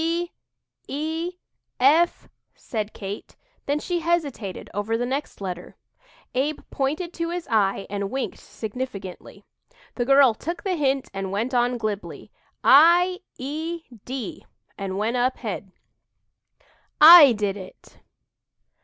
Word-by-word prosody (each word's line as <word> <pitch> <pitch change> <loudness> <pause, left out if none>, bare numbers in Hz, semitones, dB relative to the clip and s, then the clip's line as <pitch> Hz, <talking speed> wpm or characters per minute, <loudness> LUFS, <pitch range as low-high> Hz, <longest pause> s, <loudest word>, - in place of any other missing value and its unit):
"D 340 +1 -1 0.6
e 320 +5 -3 0.5
f," 310 +7 +3 0.3
said 215 -2 -4
Kate, 200 0 -8 0.3
then 285 +1 +1
she 345 +3 -2
hesitated 300 - -2
over 205 +3 -1
the 245 - -1
next 275 +4 -4
letter. 180 -3 -6 0.6
Abe 285 +4 -1
pointed 310 +6 -2
to 335 0 -3
his 350 0 -4
eye 200 -3 +2
and 200 -1 -3
winked 265 +2 -4
significantly. 210 -5 -7 0.5
The 240 - -2
girl 275 -2 +6
took 335 +10 -6
the 385 - 0
hint 275 -4 0
and 195 -1 -4
went 225 +6 -2
on 245 0 +2
glibly 215 -3 -5 0.3
"i 345 +5 +6 0.2
e 320 +5 -4 0.2
d," 255 -5 -6 0.3
and 195 -1 -4
"went 225 +4 0
up 255 +1 +1
head." 205 -4 -5 1.3
"I 310 -4 +11
DID 205 -2 -1
IT!" 190 -2 -13
260 Hz, 125 wpm, -24 LUFS, 210-320 Hz, 1.3 s, I